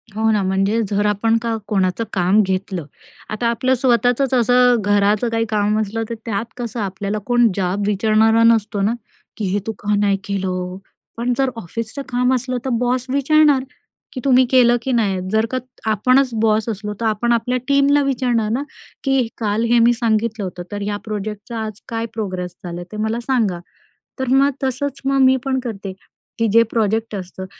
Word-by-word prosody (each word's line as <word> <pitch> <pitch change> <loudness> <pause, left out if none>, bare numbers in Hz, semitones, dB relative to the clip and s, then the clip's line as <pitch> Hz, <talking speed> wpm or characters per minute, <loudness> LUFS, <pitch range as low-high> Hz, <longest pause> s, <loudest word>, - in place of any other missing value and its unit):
हो 220 +1 +1
ना, 210 - +2
म्हणजे 195 +4 +1
जर 205 0 0
आपण 225 +2 +2
का 230 -1 -1
कोणाचं 190 +1 0
काम 190 +3 +3
घेतलं, 185 -3 -3 0.4
आता 215 +2 -1
आपलं 245 +3 +1
स्वतःचंच 245 +1 +2
असं 245 0 +4
घराचं 205 +3 +2
काही 225 0 0
काम 210 0 +1
असलं 220 +2 -3
तर - - -3
त्यात 215 0 -2
कसं 235 -2 -5
आपल्याला 200 +1 -3
कोण 240 -1 +4
जाब 195 +1 -1
विचारणारा 220 +2 +3
नसतो 215 -3 +3
ना, 215 +4 +2 0.4
की 215 - -2
हे 200 +2 0
तू - - 0
का 210 0 -1
नाही 200 -1 +2
केलं? 185 -2 -3 0.4
पण 245 +1 0
जर 270 -1 +2
ऑफिसचं 230 - -5
काम 250 0 +1
असलं 255 0 -1
तर - - -1
बॉस 250 0 0
विचारणार 280 0 +3 0.5
की 255 - -5
"तुम्ही 260 -1 +5
केलं 245 -2 +5
की 265 - -2
नाय?" 205 -6 +1
जर 220 +1 +2
का 255 - 0 0.3
आपणच 255 +5 +3
बॉस 220 0 +2
असलो 210 -1 -4
तर 230 - -2
आपण 220 +2 0
आपल्या 245 +2 0
टीमला 280 +1 +4
विचारणार 245 -5 0
ना, 245 +4 0 0.4
की 270 -4 +2
"काल 215 0 0
हे 240 - +5
मी 235 +1 +5
सांगितलं 225 -2 0
होतं 180 -1 -6
तर 205 0 -4
या 205 0 -2
प्रोजेक्टचा 210 +2 -5
आज 215 -1 -7
काय 230 0 -2
प्रोग्रेस 185 -5 -4
झालंय 175 -1 -6
ते 215 - -7
मला 225 +2 -1
सांगा." 220 -9 +1 0.6
तर 260 - -2
मग 275 +2 +4
तसंच 265 +1 -2
मग 275 0 +2
मी 260 0 +5
पण 265 -1 0
करते, 205 -6 -6 0.5
की 230 - +2
जे 230 - +7
प्रोजेक्ट 220 -1 0
असतं, 185 0 -7
225 Hz, 180 wpm, -19 LUFS, 205-245 Hz, 0.6 s, जे